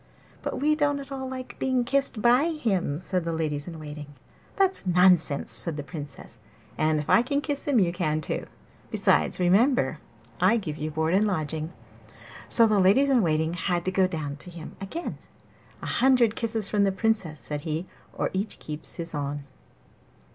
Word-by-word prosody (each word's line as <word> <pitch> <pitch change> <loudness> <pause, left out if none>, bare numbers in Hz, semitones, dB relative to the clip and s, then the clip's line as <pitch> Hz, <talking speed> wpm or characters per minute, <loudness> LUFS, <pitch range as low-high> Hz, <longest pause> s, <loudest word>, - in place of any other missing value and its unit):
'But - - -3
we 300 +2 +3
don't 290 -2 +1
at 275 0 -10
all 265 -1 -4
like 255 -1 -7
being 260 -2 +1
kissed 270 -3 0
by 245 +5 +5
him,' 195 - -1
said 180 +1 -2
the 165 - -2
ladies 155 -2 -2
in 165 -2 -7
waiting. 150 -1 -8 0.5
'That's 385 - +1
nonsense,' 180 -5 +4
said 165 -3 -3
the 145 - -4
Princess; 145 -6 -7 0.4
'and 155 0 +1
if 150 - -5
I - - +6
can 280 +4 0
kiss 290 -1 -3
him, 280 -4 +3
you 180 -5 +3
can 155 -4 0
too. 155 - -3 0.4
Besides, - - +2
remember 225 +10 +3 0.4
that - - -2
I 230 - +4
give 155 -8 -4
you 155 0 -3
board 160 +2 0
and 205 +3 +3
lodging.' 160 -3 -2 0.8
So 230 - +6
the 215 -2 +3
ladies 205 +10 +5
in 255 -3 +5
waiting 160 -2 +1
had 175 0 -1
to 185 - 0
go 185 0 +3
down 150 -5 -4
to 180 - -10
him 170 -2 -9
again. 325 - -5 0.6
'A - - -2
hundred 250 -4 +4
kisses 225 -3 -1
from 205 0 +2
the 195 - +3
Princess,' 195 -7 0
said 150 +1 -4
he, 160 +2 -3 0.3
'or - - -2
each 195 +3 -3
keeps 150 0 -6
his 170 -1 -4
own. 145 -1 -3
185 Hz, 185 wpm, -26 LUFS, 155-240 Hz, 0.8 s, I